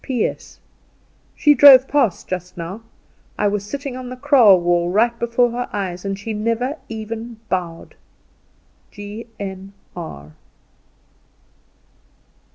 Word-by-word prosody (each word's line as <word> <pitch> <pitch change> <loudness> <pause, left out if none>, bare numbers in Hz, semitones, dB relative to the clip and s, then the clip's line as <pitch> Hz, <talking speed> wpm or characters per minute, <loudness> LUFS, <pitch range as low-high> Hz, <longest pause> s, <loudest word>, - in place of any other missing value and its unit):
"P.S. 250 -4 -3 0.8
She 295 - +4
drove 270 -2 +8
past 265 -10 0
just 180 0 -6
now; 180 +6 -6 0.6
I 210 - +1
was 205 -1 -1
sitting 275 +4 -6
on 255 -1 -7
the 255 - -6
kraal 250 -8 +5
wall 175 0 +1
right 225 +6 +2
before 235 +1 +1
her 245 +1 -4
eyes, 185 -3 -4
and 195 -1 -3
she 220 +3 -5
never 230 +7 -2
even 225 +1 -6
bowed. 175 -3 -4 1.0
G.N.R." 195 - -9
215 Hz, 110 wpm, -20 LUFS, 190-245 Hz, 1.0 s, drove